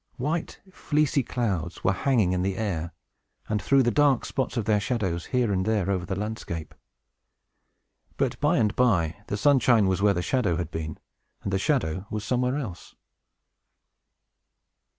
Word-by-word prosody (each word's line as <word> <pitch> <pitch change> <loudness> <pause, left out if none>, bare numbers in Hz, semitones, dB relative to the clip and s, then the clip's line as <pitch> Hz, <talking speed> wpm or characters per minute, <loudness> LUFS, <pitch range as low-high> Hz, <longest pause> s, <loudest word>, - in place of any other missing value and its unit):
White, 155 +6 -2
fleecy 150 -2 +1
clouds 100 -10 -3
were 95 - +3
hanging 110 -3 +2
in 90 - 0
the 95 +1 -1
air, 85 -6 -2 0.6
and 105 -1 -1
threw 135 +5 +4
the 120 - +2
dark 140 +1 +3
spots 130 -2 -2
of 115 - -1
their 105 -2 +3
shadow 100 -5 -1
here 120 +4 0
and 95 -1 +1
there 105 -2 0
over 90 -3 -2
the 95 - -2
landscape. 95 -6 -5 1.4
But, - - -1
by - - +2
and 105 -1 +1
by, 90 -10 +2
the 100 - -2
sunshine 120 -3 +4
was 95 0 +1
where 100 -1 +4
the 90 - -1
shadow 115 -9 +1
had 90 - -4
been, 80 -2 -5 0.5
and 100 - -3
the 95 - +2
shadow 100 - 0
was 105 -1 -4
somewhere 125 +1 +1
else. 110 - -7
105 Hz, 160 wpm, -26 LUFS, 95-125 Hz, 1.4 s, threw